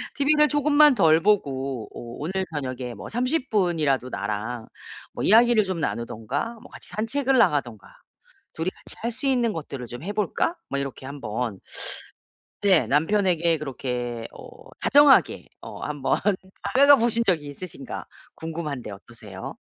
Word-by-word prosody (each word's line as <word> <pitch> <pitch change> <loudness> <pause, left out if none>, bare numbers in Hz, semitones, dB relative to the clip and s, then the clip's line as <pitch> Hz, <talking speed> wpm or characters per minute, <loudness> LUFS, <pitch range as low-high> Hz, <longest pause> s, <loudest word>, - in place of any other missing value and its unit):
"티비를 300 +2 +4
조금만 295 -1 +5
덜 160 -5 +4
보고 135 - 0
어 - - -8 0.2
오늘 190 +5 -2
저녁에 130 -4 -4
뭐 - - -9
30 255 +4 -1
분이라도 160 - +1
나랑 110 +1 -4 0.5
뭐 - - -4
이야기를 230 +1 +5
좀 185 -3 -3
나누든가 125 - -3
뭐 - - -14
같이 - - -10
산책을 265 +5 0
나가든가 120 - +1 0.7
2 165 +2 -4
이 - - +1
같이 - - -8
할 235 - 0
수 255 +4 -3
있는 245 -4 +2
것들을 140 -7 -6
좀 120 +4 -8
해 195 - -3
볼까?" 210 - 0
뭐 - - -2
이렇게 135 -1 -6
한번 125 -6 -4 1.0
네. 190 -5 +4
남편에게 170 +1 +2
그렇게 125 -4 -4
어 - - -11 0.4
다정하게 285 -1 +5
어 - - -9
한번 145 -3 -1 0.5
다가가 280 +2 +6
보신 235 -1 +1
적이 160 -7 +1
있으신가 145 0 -8 0.3
궁금한데 155 -7 -5
어떠세요? 100 -1 -10
160 Hz, 295 characters per minute, -24 LUFS, -, 1.0 s, 다가가